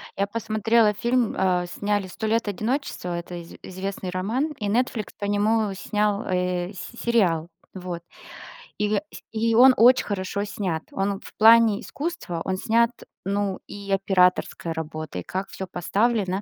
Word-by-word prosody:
Я 200 +1 0
посмотрела 220 0 +2
фильм, 235 +2 +1
а, 180 -1 +2
сняли 205 +2 -1
"Сто 220 +4 -4
лет 225 0 +1
одиночества", 205 -4 -2
это 175 +1 -7
из 170 -1 -9
известный 190 0 -5
роман, 225 - -1
и 205 - -2
"Нетфликс" 230 0 -1
по 205 - -4
нему 205 0 +1
снял, 210 +1 0
э, 180 0 -1
с 235 +5 -9
сериал, 180 -9 +2 0.3
вот. 180 -2 -6 0.8
И 210 0 +1 0.3
и 225 0 +1
он 255 +2 +8
очень 250 +3 +6
хорошо 200 0 -2
снят, 190 -6 -3
он 195 0 -1
в - - -12
плане 225 -1 +7
искусства, 285 - -5
он 185 0 -2
снят, 230 +3 +2 0.3
ну, 200 0 -1
и 200 -1 -7
операторской 180 -3 +2
работой, 155 - -5
и - - -11
как 190 +1 -4
всё 190 - -6
поставлено. 195 +2 0
200 Hz, 150 wpm, -24 LUFS, 185-225 Hz, 0.8 s, он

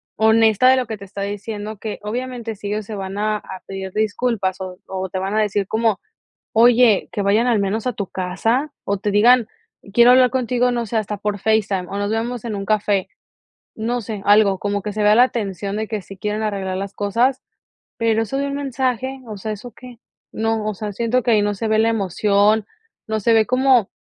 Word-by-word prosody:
honesta 220 +2 +4
de 260 - +6
lo 255 - 0
que 220 - -4
te 200 - -10
está 200 +1 -6
diciendo, 205 +1 -5
que 215 +1 -6
obviamente 240 +1 -4
sí 205 - -8
ellos 210 0 -3
se 215 - -6
van 195 0 -5
a 215 0 0
a 190 -2 -10
pedir 190 -1 -6
disculpas 215 -3 -1
o 185 -1 -6
o 190 0 -4
te 190 - -4
van 195 +2 -3
a 220 - +3
decir 205 -2 0
como: 220 -1 +1 0.5
"Oye, 235 -2 +5
que 205 - -2
vayan 210 +4 +2
al 230 -4 +2
menos 210 +5 -2
a 250 - +1
tu 200 -3 -4
casa" 225 +10 -1
o 200 -1 -1
te 205 +1 -2
digan: 235 +3 +5 0.5
"Quiero 240 +2 +7
hablar 255 -1 +5
contigo", 250 -1 +1
no 235 -1 -1
sé, 230 - -3
hasta 210 -1 -1
por 205 0 -2
FaceTime 205 -3 0
o 200 - -5
"Nos 205 +1 -1
vemos 230 +1 -2
en 220 -3 -3
un 195 - -4
café". 205 -3 +1 0.7
No 235 +2 -2
sé, 215 -2 -6
algo, 205 -2 +4
como 205 0 -2
que 210 - -4
se 215 - -2
vea 210 0 +5
la 245 - +7
atención 200 -5 -2
de 220 0 -2
que 215 -2 -3
sí 195 - -11
quieren 210 +2 -2
arreglar 195 -3 -2
las 195 +1 -5
cosas, 235 +6 +1 0.6
pero 225 -1 +2
eso 245 +5 -4
de 280 0 -1
un 280 - -3
mensaje, 265 -1 -2
o 215 -2 -7
sea, 215 +2 -4
¿eso 220 +4 -9
qué?, 245 -2 -13 0.3
no, 225 -1 -1
o 215 - -1
sea, 210 +2 -5
siento 235 +3 0
que 240 - +2
ahí 215 -2 +4
no 205 0 0
se 225 +3 -3
ve 215 0 +3
la 225 - +3
emoción, 205 +1 +2 0.4
no 220 0 -1
se 230 +3 +3
ve 220 -1 +4
como 255 -4 +3
215 Hz, 220 wpm, -20 LUFS, 200-235 Hz, 0.7 s, Quiero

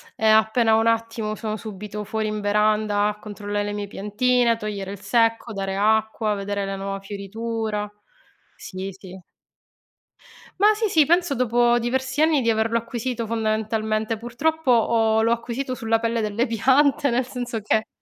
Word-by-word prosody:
e 220 - 0
appena 220 +1 +4
ho - - +4
un 225 - +1
attimo 225 -1 0
sono 215 0 -4
subito 210 -1 -7
fuori 215 +1 -2
in 215 0 -3
veranda 210 0 +2
a 210 0 -3
controllare 205 -1 -4
le 205 - -3
mie 205 -1 -4
piantine, 235 +5 +1
a 230 - +1
togliere 205 -3 -5
il 200 - -8
secco, 230 0 +1
dare 195 -1 -3
acqua, 220 0 +1
vedere 200 0 -3
la 195 - -3
nuova 195 0 -4
fioritura. 210 +1 -4 0.7
Sì, 185 +1 -7
sì. 185 -1 -12 1.4
Mah 425 +1 +6
sì, 435 0 0
sì 315 -6 +4
penso 345 -1 +2
dopo 240 0 +3
diversi 260 +4 -1
anni 310 -3 +4
di 230 - +1
averlo 225 +1 +1
acquisito, 235 +1 -3
fondamentalmente. 220 0 -1
Purtroppo, 265 +6 -1
ho 225 -1 +3
l'ho 230 - +2
acquisito 240 +3 -2
sulla 225 -2 0
pelle 230 0 -1
delle 215 +3 0
piante 265 +5 +3
nel 245 +2 +1
senso 245 -2 -4
che, 220 +1 0
220 Hz, 165 wpm, -23 LUFS, 210-240 Hz, 1.4 s, Mah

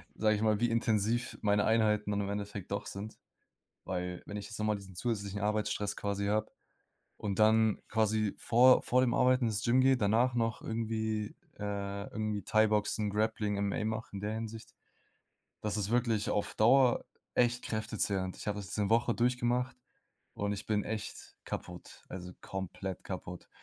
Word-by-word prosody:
sage 110 0 +3
ich 105 - -2
mal, 110 -2 +3
wie 120 +1 +2
intensiv 115 0 +1
meine 105 -1 +3
Einheiten 105 -2 +2
dann 100 - 0
im 100 - -3
Endeffekt 100 -2 -5
doch 100 - -2
sind. 105 +3 -7 0.7
Weil 90 -1 -3
wenn 105 - -7
ich 100 - -5
jetzt 110 - -8
noch 110 - 0
mal 105 -1 +2
diesen 95 -2 -10
zusätzlichen 100 -2 -2
Arbeitsstress 105 -1 0
quasi 100 0 -2
habe 110 +1 0 0.7
und 100 -3 -3
dann 110 0 +4
quasi 110 -1 +1
vor 125 +2 +6
vor 125 +1 +2
dem 125 -2 +2
Arbeiten 130 0 +4
ins 105 -2 -1
Gym 120 +2 +4
gehe, 135 0 +5
danach 120 +2 +2
noch 115 -2 0
irgendwie, 110 -1 -2 0.2
äh, 100 -1 -3
irgendwie 110 -1 -2
Thaiboxen, 105 0 +2
Grappling, 105 0 0
MMA 105 +2 -1
mache 110 +1 -3
in 100 - -4
der 105 +2 -2
Hinsicht, 110 0 -6 0.9
das 105 -1 -2
ist 105 -1 -1
wirklich 115 -3 +1
auf 105 - -1
Dauer 125 +3 +5 0.3
echt 120 0 +2
kräftezehrend, 100 -4 -1
ich - - -9
habe 105 0 -1
das 100 -2 -6
diese 100 0 -1
Woche 115 +1 +3
durchgemacht 125 +1 +1 0.6
und 100 0 -1
ich 105 +1 -6
bin 105 -1 +1
echt 110 0 -6
kaputt - - -7
also 90 -1 -7
komplett 95 0 -5
kaputt 90 -2 -7
110 Hz, 170 wpm, -32 LUFS, 100-115 Hz, 0.9 s, vor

